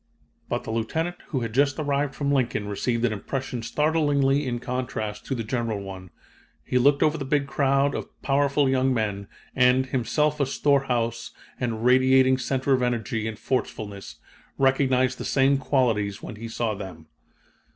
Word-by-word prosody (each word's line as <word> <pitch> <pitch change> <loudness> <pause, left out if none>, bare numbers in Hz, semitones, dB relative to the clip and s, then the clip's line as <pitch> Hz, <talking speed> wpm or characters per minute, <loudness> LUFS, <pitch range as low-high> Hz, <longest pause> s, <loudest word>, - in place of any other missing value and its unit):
"But - - -2
the - - -5
Lieutenant 160 +11 -2
who 130 - -2
had 115 -2 -4
just 140 +2 +2
arrived 145 -2 -1
from 140 +2 -1
Lincoln 125 -6 0
received 115 +3 -1
an 115 - +1
impression 125 +3 -4
startlingly 145 +1 +1
in 120 -1 -1
contrast 120 -4 -4
to 135 - -1
the 115 - -3
general 115 -2 -2
one. 95 -2 -8 0.6
He 125 - +1
looked 140 +3 +4
over 155 +1 +2
the - - -3
big 140 +1 +1
crowd 140 0 +1
of - - -5
powerful 140 0 +2
young 130 0 +2
men, 100 -3 -2 0.3
and, 130 0 +4
himself 130 +4 0
a 140 - +2
storehouse 125 -5 0 0.3
and 115 -2 -2
radiating 130 +1 +5
center 130 +2 0
of 130 - +2
energy 115 -2 -1
and 110 -1 -5
forcefulness, 105 -5 -4 0.4
recognized 130 -1 +2
the - - -4
same 135 0 +2
qualities 115 -8 0
when - - -7
he 115 +2 -6
saw 115 -1 -2
them. 95 -6 -8
130 Hz, 160 wpm, -25 LUFS, 115-140 Hz, 0.6 s, radiating